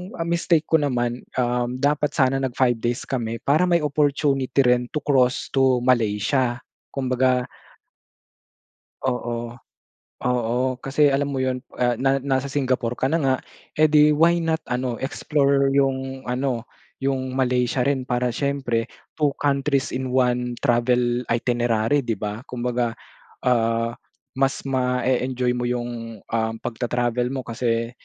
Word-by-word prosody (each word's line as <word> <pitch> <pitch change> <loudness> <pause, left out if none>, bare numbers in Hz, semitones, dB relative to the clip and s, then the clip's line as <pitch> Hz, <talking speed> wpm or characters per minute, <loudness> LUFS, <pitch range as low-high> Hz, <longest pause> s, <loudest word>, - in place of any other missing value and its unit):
ang 165 -1 -3
mistake 170 -2 +2
ko 160 - +4
naman, 120 -4 -1 0.2
um, 125 0 0
dapat 150 +1 +1
sana 135 -1 +2
nag 130 -2 -3
5 120 -3 +2
days 120 +2 -2
kami 115 -3 -3
para 155 +6 +3
may 170 -3 +2
opportunity 140 -2 +1
rin 125 -1 +2
to 150 - -1
cross 130 -2 +2
to 130 -2 +3
Malaysia, 120 +1 +1 0.4
kumbaga 130 -1 +1 1.6
Oo, 120 -2 -2 0.7
oo 120 -1 +1 0.2
kasi 145 +2 +3
alam 140 +1 +1
mo 140 - -3
yun, 130 -1 -1 0.2
ah, 120 -1 +2
na 135 +1 +2
nasa 135 0 -1
Singapore 130 -4 -1
ka - - 0
na 165 - +3
nga, 135 -1 +3 0.4
eh, 155 - +6
di 150 0 +5
why 165 +3 +4
not 160 -1 0
ano 125 -1 -1
explore 140 0 +1
yung 135 -1 0
ano 125 -1 -2 0.4
yung 130 -1 -1
Malaysia 125 -1 +1
rin 135 -2 0
para 125 0 0
siyempre 130 -4 -1 0.3
2 150 -3 +2
countries 140 -1 +1
in 130 0 -2
1 125 -1 +1
travel 120 -1 +2
itinerary 120 +2 +1
'di 115 - 0
ba? 105 +2 -4
Kumbaga, 120 -1 -2 0.5
ah, 115 -1 +2 0.4
mas 135 0 +1
ma-e-enjoy 125 -1 0
mo 120 0 -2
yung, 120 -3 -4
um, 110 -1 -1
pagtatravel 120 0 -1
mo 130 - -2
kasi 115 0 -1
125 Hz, 135 wpm, -23 LUFS, 120-140 Hz, 1.6 s, eh